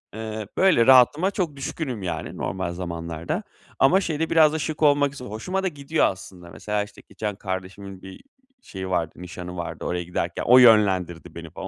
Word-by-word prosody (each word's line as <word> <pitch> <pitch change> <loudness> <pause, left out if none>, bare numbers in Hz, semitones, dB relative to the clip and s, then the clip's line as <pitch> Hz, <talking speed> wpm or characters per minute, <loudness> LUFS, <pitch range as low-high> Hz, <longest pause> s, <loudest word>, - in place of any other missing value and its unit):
ııı, 110 -1 -5
böyle 180 -12 +4
rahatıma 135 +9 +5
çok 170 -8 -2
düşkünüm, 135 - -5
yani 90 - -4
normal 95 -2 -3
zamanlarda. 85 -2 -4 0.4
Ama 185 +9 +5
şey 155 -5 -3
de 165 - -1
biraz 155 -2 +5
da 160 - -2
şık 155 0 -3
olmak 145 -1 +4
üzere 125 -4 -9
hoşuma 185 - -3
da - - +1
gidiyor 150 0 0
aslında. 90 -2 -5
Mesela, 105 +6 -3
işte, 105 - -14
geçen 105 -2 -4
kardeşimin 95 0 -6
bir, 95 - -10
iii, - - -13 0.4
şeyi 95 - -7
vardı, 85 -3 -1
nişanı 90 0 -8
vardı, 85 - -6
oraya 90 0 -2
giderken 85 0 -3
o 125 +1 +6
yönlendirdi 95 -8 +4
beni 85 -1 -8
falan 95 +4 -8
105 Hz, 185 wpm, -24 LUFS, 90-140 Hz, 0.4 s, o